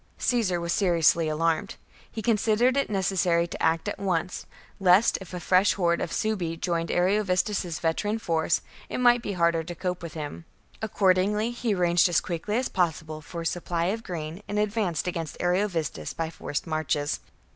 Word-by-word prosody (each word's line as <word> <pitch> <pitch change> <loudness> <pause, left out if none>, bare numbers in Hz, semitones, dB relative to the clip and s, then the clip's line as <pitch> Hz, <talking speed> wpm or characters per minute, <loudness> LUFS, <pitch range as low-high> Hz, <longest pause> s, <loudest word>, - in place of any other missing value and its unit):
Caesar 215 -8 +1
was 170 0 -1
seriously 170 -4 +3
alarmed. 165 +4 0 0.4
He 220 - -5
considered 230 +2 +3
it 280 - +1
necessary 185 -3 +1
to 170 - -7
act 165 0 +1
at - - -3
once, 180 -2 -2 0.3
lest, 190 +3 +5
if 190 - -10
a 180 - -5
fresh 185 +3 +3
horde 170 -3 +1
of - - -3
Suebi 185 -7 -1
joined 170 -2 -1
Ariovistus's 185 -1 +1
veteran 205 +6 0
force, 165 -5 0 0.3
it - - -3
might 245 -1 +5
be 205 - -3
harder 170 -2 +2
to 175 +2 -7
cope 180 +1 -3
with 170 -1 -8
him. 155 +1 -6 0.4
Accordingly 210 +1 +2
he 240 -3 -1
arranged 175 0 +3
as 170 - +3
quickly 175 +5 -3
as 255 - 0
possible 160 -3 -1
for 170 +2 -7
a - - -6
supply 170 0 -1
of 225 - -5
grain, 170 -2 -6
and 205 - -3
advanced 210 -6 0
against 165 -4 -4
Ariovistus 175 - -1
by 165 0 -3
forced 145 -3 -4
marches. 155 -2 -1
180 Hz, 170 wpm, -26 LUFS, 165-205 Hz, 0.4 s, lest